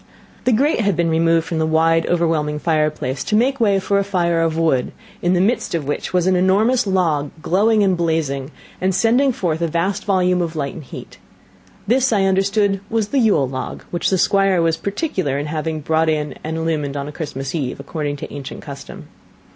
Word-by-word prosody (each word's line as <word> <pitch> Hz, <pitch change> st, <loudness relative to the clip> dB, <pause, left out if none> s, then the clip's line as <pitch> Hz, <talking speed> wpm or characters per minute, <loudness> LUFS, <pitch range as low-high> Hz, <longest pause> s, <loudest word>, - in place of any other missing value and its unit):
The 255 Hz, -, +3 dB
grate 275 Hz, +6 st, +2 dB
had 200 Hz, -4 st, +1 dB
been 170 Hz, -1 st, +1 dB
removed 165 Hz, 0 st, +2 dB
from 165 Hz, -, -3 dB
the 160 Hz, -, +1 dB
wide 165 Hz, +1 st, +2 dB
overwhelming 160 Hz, -3 st, 0 dB
fireplace, 150 Hz, -4 st, -1 dB
to 210 Hz, -, 0 dB
make 260 Hz, +5 st, +2 dB
way 205 Hz, -4 st, +3 dB
for 200 Hz, +1 st, +1 dB
a -, -, +1 dB
fire 175 Hz, -4 st, 0 dB
of 165 Hz, -1 st, 0 dB
wood, 160 Hz, -6 st, +1 dB, 0.3 s
in 175 Hz, +1 st, +2 dB
the -, -, +2 dB
midst 200 Hz, -1 st, 0 dB
of 160 Hz, -4 st, -2 dB
which 145 Hz, -, -3 dB
was 180 Hz, -1 st, +1 dB
an 185 Hz, 0 st, +3 dB
enormous 205 Hz, +7 st, +2 dB
log 165 Hz, -7 st, +1 dB
glowing 210 Hz, +3 st, +3 dB
and 190 Hz, -2 st, +2 dB
blazing, 160 Hz, -5 st, -1 dB, 0.3 s
and 185 Hz, 0 st, +1 dB
sending 245 Hz, +7 st, +3 dB
forth 170 Hz, -8 st, -2 dB
a 170 Hz, -, +1 dB
vast 170 Hz, +5 st, -1 dB
volume 180 Hz, -2 st, +2 dB
of 165 Hz, -1 st, -3 dB
light 140 Hz, -3 st, -3 dB
and 155 Hz, -, -9 dB
heat; -, -, -10 dB, 0.7 s
this 250 Hz, +3 st, +2 dB
I 205 Hz, -3 st, +2 dB
understood 195 Hz, +1 st, +2 dB
was 220 Hz, -2 st, -1 dB
the 280 Hz, -, +1 dB
Yule 205 Hz, -, +3 dB
log, 130 Hz, 0 st, -6 dB
which 175 Hz, -, 0 dB
the 190 Hz, -, +2 dB
Squire 195 Hz, 0 st, +3 dB
was 165 Hz, -1 st, +2 dB
particular 190 Hz, -, -2 dB
in 145 Hz, -, -3 dB
having 155 Hz, 0 st, -3 dB
brought 160 Hz, +2 st, +1 dB
in 150 Hz, -1 st, -1 dB
and 160 Hz, +1 st, -3 dB
illumined 155 Hz, -3 st, -2 dB
on 140 Hz, 0 st, -4 dB
a -, -, -6 dB
Christmas 135 Hz, -4 st, -5 dB
eve, 140 Hz, -7 st, -3 dB
according 145 Hz, 0 st, -4 dB
to 140 Hz, -, -8 dB
ancient 140 Hz, -2 st, -7 dB
custom. 140 Hz, -2 st, -9 dB
170 Hz, 200 wpm, -19 LUFS, 155-195 Hz, 0.7 s, The